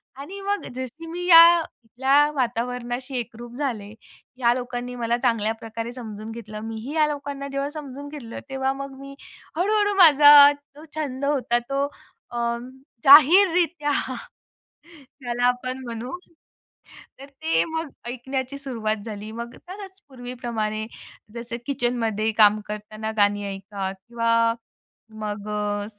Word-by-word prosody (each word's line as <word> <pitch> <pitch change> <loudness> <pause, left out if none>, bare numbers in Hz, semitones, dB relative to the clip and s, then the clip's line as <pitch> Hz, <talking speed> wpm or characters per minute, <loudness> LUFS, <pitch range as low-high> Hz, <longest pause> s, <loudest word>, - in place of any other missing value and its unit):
आणि 325 +9 -8
मग 405 +1 -2
जशी 260 +6 -7
मी 350 +2 -5
या 340 0 +8 0.4
या 270 +1 +3 0.2
वातावरणाशी 250 +1 -2
एकरूप 240 0 -7
झाले, 225 -8 -3 0.4
या 240 -2 +3
लोकांनी 245 0 -5
मला 235 -1 0
चांगल्या 230 -3 +1
प्रकारे 230 +1 -6
समजून 220 -3 -8
घेतलं. 215 -2 -8
मी 225 - -5
ही 275 +6 -6
या 310 -1 +4
लोकांना 285 -1 -5
जेव्हा 275 +1 -2
समजून 285 -2 -8
घेतलं, 255 -6 -8
तेव्हा 265 0 -1
मग 275 0 -8
मी 275 0 -10 0.4
हळ-हळू 410 +3 +2
माझा 290 -4 +9
तो 285 +1 -17
छंद 280 -3 -3
होता, 250 -4 +1
तो 275 +3 -2 0.5
अ, 240 - -5 0.7
जाहीररीत्या 330 +1 +6 1.3
त्याला 245 0 -1
आपण 255 +1 -1
म्हणू 235 +6 -6 1.0
तर, 275 - -9
ते 315 +4 0
मग 320 -1 -4 0.2
ऐकण्याची 260 +2 -4
सुरुवात 220 -6 -3
झाली. 215 0 -7
मग 235 +1 -7
खरंच 385 0 -10
पूर्वीप्रमाणे, 240 -4 -4 0.5
जसं 235 0 -5
किचनमध्ये 230 -5 0
काम 210 0 +6
करताना 215 +1 -5
गाणी 205 0 +2
ऐका 195 0 -5
किंवा 230 +4 -2 0.9
मग 205 0 -5
अ, 205 -1 -2
250 Hz, 125 wpm, -24 LUFS, 225-285 Hz, 1.3 s, माझा